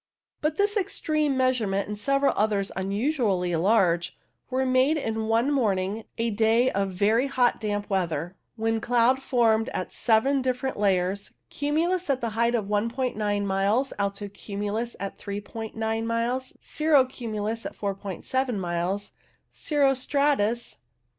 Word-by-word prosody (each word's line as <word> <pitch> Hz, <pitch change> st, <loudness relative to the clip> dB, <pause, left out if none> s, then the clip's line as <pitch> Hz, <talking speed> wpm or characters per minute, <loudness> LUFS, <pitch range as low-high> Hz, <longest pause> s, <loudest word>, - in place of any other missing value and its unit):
But 305 Hz, 0 st, 0 dB
this 410 Hz, +3 st, +2 dB
extreme 305 Hz, -7 st, 0 dB
measurement, 230 Hz, -7 st, +1 dB
and 210 Hz, -, -4 dB
several 275 Hz, +6 st, +2 dB
others 205 Hz, -2 st, +1 dB
unusually 195 Hz, -, 0 dB
large, 175 Hz, -2 st, +2 dB, 0.3 s
were 260 Hz, 0 st, 0 dB
made 260 Hz, +4 st, +3 dB
in 225 Hz, -5 st, -2 dB
one 230 Hz, +5 st, +2 dB
morning, 210 Hz, -5 st, 0 dB
a 230 Hz, 0 st, 0 dB
day 225 Hz, +4 st, +3 dB
of 195 Hz, 0 st, 0 dB
very 210 Hz, +7 st, +2 dB
hot 255 Hz, -3 st, +2 dB
damp 205 Hz, -1 st, -2 dB
weather, 175 Hz, -2 st, -1 dB, 0.2 s
when 225 Hz, 0 st, 0 dB
cloud 245 Hz, +3 st, +3 dB
formed 230 Hz, -4 st, +2 dB
at 185 Hz, -, -3 dB
seven 265 Hz, +5 st, +2 dB
different 255 Hz, -1 st, -2 dB
levels: 195 Hz, 0 st, 0 dB, 0.2 s
cumulus 330 Hz, +5 st, 0 dB
at 260 Hz, -3 st, 0 dB
a 230 Hz, -, 0 dB
height 235 Hz, +2 st, +1 dB
of 210 Hz, -2 st, -2 dB
i 205 Hz, -, +4 dB, 0.4 s
"9 205 Hz, -1 st, 0 dB
miles, 200 Hz, +7 st, +1 dB
alto 200 Hz, 0 st, -2 dB
cumulus 205 Hz, +3 st, -4 dB
at 195 Hz, 0 st, -5 dB
3*9 220 Hz, +2 st, -4 dB
miles, 235 Hz, +3 st, -2 dB
cirro 305 Hz, -4 st, +3 dB
cumulus 225 Hz, -3 st, -4 dB
at -, -, -10 dB
47 205 Hz, +5 st, -2 dB
miles, 180 Hz, +3 st, -2 dB, 0.4 s
cirro 285 Hz, -3 st, +2 dB
stratus 260 Hz, -4 st, 0 dB
(No. -, -, -45 dB
225 Hz, 140 wpm, -26 LUFS, 200-260 Hz, 0.4 s, i